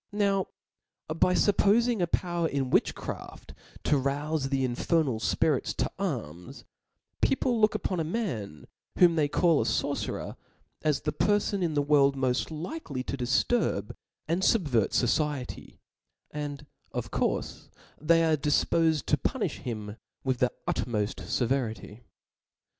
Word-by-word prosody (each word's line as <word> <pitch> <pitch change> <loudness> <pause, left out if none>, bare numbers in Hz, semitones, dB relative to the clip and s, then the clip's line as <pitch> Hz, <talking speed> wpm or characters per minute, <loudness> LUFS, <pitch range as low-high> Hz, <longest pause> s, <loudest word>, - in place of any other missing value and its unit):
Now 200 -2 +1 0.7
by 180 +2 +3
fuppofing 215 +2 +3
a 175 - +2
power 175 -1 0
in 135 -4 -2
witchcraft - - -2 0.3
to 145 -3 +2
roufe 140 +1 -1
the 135 -1 +1
in 125 - -2
fernal 140 -3 +1
fpirits - - +1
to - - -1
arms, 90 - -5 0.6
people 245 -4 +1
look 215 0 +4
upon 185 - -1
a - - +1
man 155 - -4 0.3
whom 175 -2 +6
they 150 -3 +2
call 165 +1 +3
a - - +1
forcerer - - -2 0.4
as 150 -3 +1
the 150 - -1
perfon 205 -1 +1
in 165 -4 0
the 145 - +2
world 140 -1 +4
raoft 130 -1 0
likely 160 - -5
to 140 - -4
difturb 125 - +1 0.4
and 170 +4 0
fubvert 145 - +3
focicty; 135 +1 -1 0.5
and 150 0 -5 0.3
of - - -4
courfe,'they 165 +2 -1
are 160 -1 +3
difpofed 155 +1 +2
to - - +2
punilh - - -1
him 110 -3 -6 0.3
with 130 -2 -1
the 125 - +2 0.2
tatmoft 105 -4 -1
feveritv. 115 -4 -2
150 Hz, 130 wpm, -28 LUFS, 130-175 Hz, 0.7 s, whom